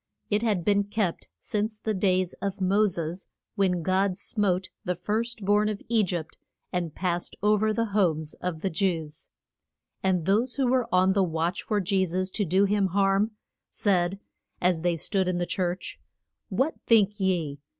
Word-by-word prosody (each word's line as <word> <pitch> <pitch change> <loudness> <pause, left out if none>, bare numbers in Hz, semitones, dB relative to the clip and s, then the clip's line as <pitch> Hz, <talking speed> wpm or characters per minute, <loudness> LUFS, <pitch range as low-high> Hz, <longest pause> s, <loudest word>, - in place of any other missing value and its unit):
It 210 +1 +2
had 210 -7 0
been 205 -1 +3
kept 205 -4 -2
since 215 +1 -2
the 215 0 -2
days 185 -2 +1
of 200 0 -3
Mo 200 +3 +3
ses, 170 0 -4 0.3
when 185 -4 +1
God 190 +1 +1
smote 195 -3 0
the 180 - -1
first 220 +4 -2
born 210 +1 +3
of 210 -1 -3
E 230 -2 +4
gypt, 170 -4 -4 0.3
and 175 -4 -2
passed 175 -2 -2
o 210 +1 +5
ver 215 +1 +1
the 230 +1 0
homes 160 -7 +1
of 175 -3 -3
the 195 - -1
Jews. 160 -3 -2 0.7
And 185 -4 +1
those 220 +7 +2
who 275 - +1
were 250 -1 +1
on 185 +1 +4
the 200 - +2
watch 165 0 -1
for 210 - 0
Je 190 0 +1
sus 185 +1 -1
to 205 - -1
do 190 +4 +3
him 200 -1 +2
harm, 195 +3 +2 0.4
said, 190 -1 +1 0.4
as 180 -2 +2
they 175 0 +1
stood 190 +3 -1
in 180 -1 0
the 175 - 0
church, 180 0 -3 0.5
What 285 +5 +1
think 210 -2 +4
ye? 170 -7 0
190 Hz, 175 wpm, -27 LUFS, 180-210 Hz, 0.7 s, o